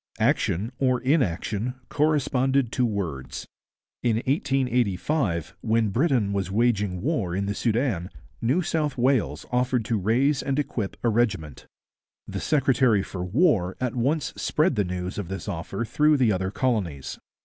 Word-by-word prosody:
Action, 100 +8 +1
or 130 -2 +2
inaction, 125 - 0
corresponded 135 -4 +1
to 125 -1 +1
words. 85 - -4 0.6
In 115 -2 +2
1885, 125 - 0
when 110 -1 +1
Britain 120 - +1
was 95 -2 -1
waging 105 -4 +1
war 115 - -1
in 100 +1 -1
the 100 - -1
Soudan, 110 -5 0 0.3
New 135 +11 +2
South 155 -4 -1
Wales 120 - +1
offered 125 -2 +1
to 115 -2 0
raise 130 +8 +2
and 135 0 -1
equip 115 -8 -2
a 120 - +3
regiment. 105 - -1 0.6
The - - -4
secretary 130 -7 +3
for 90 -2 -5
war 95 - +2
at 125 -2 -1
once 130 +2 0
spread 155 +3 +1
the 105 - +2
news 90 +1 -4
of 100 - -4
this 95 -1 -6
offer 95 +7 -3
through 150 +6 +3
the 125 -5 +3
other 95 -1 -1
colonies. 100 - -2
115 Hz, 145 wpm, -25 LUFS, 95-135 Hz, 0.6 s, a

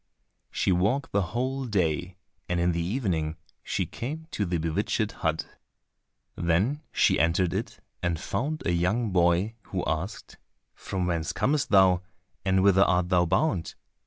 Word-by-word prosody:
She - - 0
walked 105 +11 +1
the 100 - +2 0.2
whole 130 +2 -1
day, 90 -4 -1 0.3
and 90 -1 0
in 85 +1 +2
the 85 0 -1
evening 85 - -1 0.2
she - - -1
came 155 +7 -6
to 105 -8 -1
the 85 0 0
bewitched 100 +6 -1
hut. 80 -7 -1 0.9
Then 95 - +1
she - - +3
entered 85 +2 +2
it 110 +2 -4 0.2
and 85 -2 -1
found 150 - -2
a - - +2
young 95 +6 +1
boy, 90 +4 +2
who - - -3
asked, - - -4 0.4
"From 95 -2 -3
whence 85 -2 -1
comest 145 -1 0
thou, 95 -4 +5 0.4
and 95 -1 +2
whither 95 -1 +5
art 90 -1 +3
thou 90 -2 +3
bound?" 95 - 0
95 Hz, 150 wpm, -27 LUFS, 85-115 Hz, 0.9 s, thou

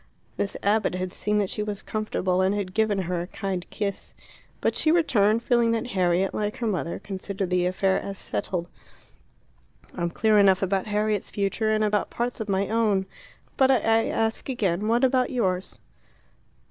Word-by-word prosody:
Miss 200 - -2
Abbott 205 -2 +2
had 185 0 -3
seen 210 +3 -1
that 200 -2 0
she - - -3
was 210 -1 -4
comfortable, 190 -4 -1
and 190 +2 +2
had 195 -3 -3
given 220 -1 +1
her 175 0 -2
a 175 - -5
kind 195 -3 -3
kiss. 200 -2 -4 0.4
But - - 0
she 310 - +2
returned 230 -10 +3
feeling 235 -1 +3
that 225 - -1
Harriet, 185 0 +1
like 210 0 -2
her 240 - -3
mother, 185 -5 -1
considered 195 -1 -5
the 180 0 +2
affair 190 +1 +1
as 195 -1 -6
settled. 170 - -3 1.3
"I'm 170 -1 -2
clear 215 +4 +3
enough 195 -1 +4
about 195 +1 0
Harriet's 210 -1 0
future, 210 +2 -1
and 215 0 +2
about 210 0 +1
parts 240 +1 -3
of 215 -1 -4
my 195 0 +1
own. 215 -4 +1 0.5
But 265 -1 +5
I 225 -3 +3
ask 225 +3 -1
again, 205 -5 0
What 235 +3 +2
about 255 -1 +3
yours?" 190 -7 -1
205 Hz, 170 wpm, -25 LUFS, 185-220 Hz, 1.3 s, But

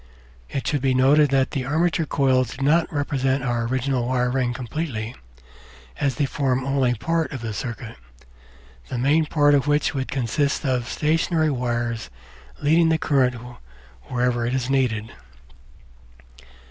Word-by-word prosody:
It 135 - -4
should 145 -3 0
be 130 -1 +1
noted 140 +3 +5
that 135 0 +1
the 135 -4 -2
armature 160 +4 0
coils 130 -4 +1
do 135 - -4
not 160 +3 +3
represent 135 -2 0
our 120 -2 -1
original 130 0 -1
wire 125 -1 +1
ring 125 -2 0
completely, 120 -2 -4 0.9
as 135 -2 0
they 145 - +1
form 130 -1 -1
only 135 -3 +1
part 165 +8 -1
of 135 -5 -6
the 110 -2 -4
circuit, 115 +1 -6 0.9
the 125 - -4
main 150 +5 +2
part 145 -2 +3
of 140 0 +2
which 145 +1 +2
would 130 -2 -2
consist 140 +4 -1
of 125 -3 0
stationary 160 0 +1
wires 120 - -2 0.5
leading 160 +3 +4
the 160 - +3
current 135 -5 +2 0.7
wherever 125 -1 0
it 120 +2 -1
is 130 0 -1
needed. 115 -5 0
130 Hz, 145 wpm, -23 LUFS, 125-145 Hz, 0.9 s, noted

